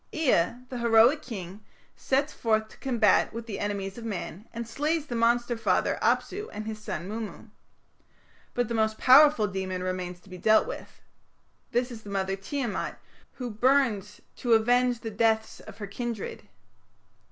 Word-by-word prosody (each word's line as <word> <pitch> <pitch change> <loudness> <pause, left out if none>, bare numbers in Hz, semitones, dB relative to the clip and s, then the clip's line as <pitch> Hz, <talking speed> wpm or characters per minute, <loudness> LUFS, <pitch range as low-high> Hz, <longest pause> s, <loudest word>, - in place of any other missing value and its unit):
Ea, 255 - +2
the 250 - -5
heroic 235 +5 +5
king, 200 - -8 0.3
sets 275 +3 0
forth 220 -1 0
to - - -16
combat 235 -7 +3
with 230 0 -6
the 205 -4 -5
enemies 200 0 -3
of - - -9
man, 205 -2 -5
and 235 -1 -5
slays 300 +5 -1
the 245 - -5
monster 240 +1 +2
father, 225 - +1
Apsu, 420 +2 0
and 215 +1 -6
his 215 -1 -5
son, 170 -2 -4
Mummu. 220 +1 -6 1.1
But 245 -1 +1
the 235 - -3
most 220 -1 +1
powerful 280 -2 +7
demon 185 -2 -3
remains 180 -1 -4
to 200 - -19
be 180 - -8
dealt 220 +3 +4
with. - - -8 0.7
This 245 +1 0
is 225 -2 -8
the 205 - -11
mother 195 -1 -1
Tiamat, 235 +4 -3 0.4
who 250 -2 -5
burns 215 -4 +1 0.2
to 240 -2 +2
avenge 245 +2 +3
the 225 - -5
deaths 220 +1 +1
of 215 -2 -12
her 210 - -5
kindred. 215 0 -5
225 Hz, 165 wpm, -27 LUFS, 205-245 Hz, 1.1 s, powerful